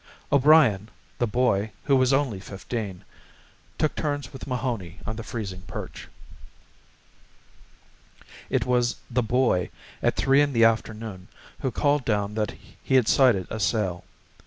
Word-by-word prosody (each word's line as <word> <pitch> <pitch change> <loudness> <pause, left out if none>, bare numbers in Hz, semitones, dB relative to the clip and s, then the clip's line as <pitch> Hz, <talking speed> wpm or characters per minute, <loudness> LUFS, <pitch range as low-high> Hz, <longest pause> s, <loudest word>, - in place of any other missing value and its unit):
O'Brien, 140 -8 +5 0.3
the 120 - +2
boy, 110 -2 +1
who 140 - +3
was 130 0 +3
only 135 -7 +1
fifteen, 100 0 -6 0.7
took 155 - +1
turns 145 -3 -3
with 135 - -8
Mahoney 120 -9 -3
on 110 - -3
the 115 - -5
freezing 100 -5 -6
perch. - - -7 2.4
It - - +1
was 125 -1 +1 0.2
the 125 +1 +2
boy, 120 -6 +1 0.3
at - - +1
three 135 +1 +4
in 145 -1 +1
the 115 -1 +5
afternoon, 110 -4 -1 0.3
who 130 - -1
called 145 +3 +1
down 105 -3 0
that 105 -1 -2 0.3
he 130 - 0
had 125 -4 +4
sighted 120 -9 +4
a 110 - -3
sail. 100 -4 0
115 Hz, 135 wpm, -25 LUFS, 105-130 Hz, 2.4 s, O'Brien